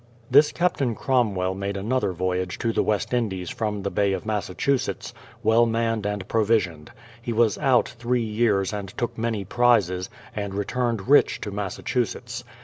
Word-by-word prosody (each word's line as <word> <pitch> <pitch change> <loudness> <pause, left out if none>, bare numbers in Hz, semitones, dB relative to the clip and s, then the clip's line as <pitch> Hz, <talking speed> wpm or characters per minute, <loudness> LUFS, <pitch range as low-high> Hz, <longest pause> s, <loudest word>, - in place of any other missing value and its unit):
This 145 +3 +6
Captain 145 -9 0
Cromwell 105 -9 +1
made 100 +1 -3
another 110 +1 0
voyage 90 +1 -2
to 115 -1 -1
tlie - - +2
West 105 +2 -1
Indies 95 -8 -1
from 105 -3 -3
the 100 - -2
Bay 100 -1 +1
of - - -4
Massachusetts, 110 +5 -1 0.3
well 115 +2 +4
manned 115 -2 0
and 105 -2 -3
provisioned. 105 -9 +1 0.3
He 120 0 -4
was 115 -1 +2
out 135 -4 +3
three 120 0 -1
years 105 -3 +1
and 100 -2 -4
took 120 -1 -2
many 110 -3 -2
prizes, 95 -5 +2 0.3
and 100 -2 -4
returned 115 +1 -1
rich 145 +2 +5
to 105 - -4
Massachusetts. 105 +4 -3
110 Hz, 155 wpm, -24 LUFS, 95-120 Hz, 0.3 s, This